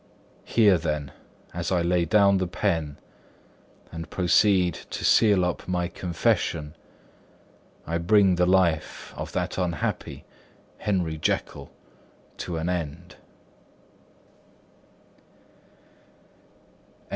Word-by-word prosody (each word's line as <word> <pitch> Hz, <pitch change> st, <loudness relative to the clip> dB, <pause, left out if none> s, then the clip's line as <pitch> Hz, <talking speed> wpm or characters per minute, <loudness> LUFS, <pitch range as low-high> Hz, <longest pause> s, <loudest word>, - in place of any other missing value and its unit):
Here 105 Hz, -6 st, +4 dB
then, 75 Hz, -3 st, -3 dB, 0.4 s
as 85 Hz, +1 st, -3 dB
I 90 Hz, -2 st, +2 dB
lay 85 Hz, 0 st, +1 dB
down 100 Hz, +2 st, +4 dB
the 95 Hz, -, -1 dB
pen 80 Hz, -6 st, -2 dB, 0.9 s
and 80 Hz, -1 st, -7 dB
proceed 90 Hz, 0 st, +3 dB, 0.2 s
to -, -, -4 dB
seal 100 Hz, -5 st, +4 dB
up 90 Hz, -, -4 dB
my 90 Hz, -1 st, -1 dB
confession, 85 Hz, -4 st, -1 dB, 1.1 s
I 85 Hz, +1 st, -2 dB
bring 95 Hz, +2 st, +4 dB
the 90 Hz, 0 st, +2 dB
life 90 Hz, -4 st, +1 dB
of -, -, -6 dB
that -, -, -2 dB
unhappy 85 Hz, -4 st, -3 dB, 0.5 s
Henry 90 Hz, -6 st, -1 dB
Jekyll -, -, -2 dB, 0.7 s
to 85 Hz, -2 st, -4 dB
an 80 Hz, +1 st, -3 dB
end. 90 Hz, 0 st, -4 dB
90 Hz, 95 wpm, -25 LUFS, 80-95 Hz, 1.1 s, Here